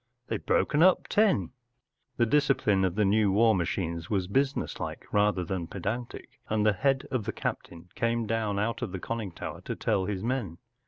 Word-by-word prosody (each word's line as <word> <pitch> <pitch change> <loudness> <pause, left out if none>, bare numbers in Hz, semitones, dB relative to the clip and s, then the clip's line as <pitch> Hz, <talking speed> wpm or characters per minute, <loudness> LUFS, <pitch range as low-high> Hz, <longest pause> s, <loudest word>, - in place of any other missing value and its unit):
They’ve - - -4
broken 150 - +2
up 185 +1 +5
Ten 215 -1 +4
1 90 - -7 0.3
” - - -50
The 120 - +4
discipline 115 -7 +2
of 90 -1 -1
the 105 0 +2
new 105 0 +3
war 110 +3 +5
machines 85 -2 -2
was 95 -4 0
business 135 +7 0
like - - -5
rather 105 -3 +2
than 85 -1 -3
pedantic, 110 +7 -5
and 110 -1 +1
the 105 - +5
head 135 +7 +1
of 125 -5 -1
the 110 - -1
captain 85 -4 -5
came 115 0 0
down 110 -2 -1
out 115 +3 -1
of 90 - -4
the 95 - -3
conning 110 -1 -4
tower - - -7
to - - -5
tell 95 - 0
his 95 -1 -3
men. 115 -9 -2
105 Hz, 200 wpm, -28 LUFS, 95-115 Hz, 0.3 s, up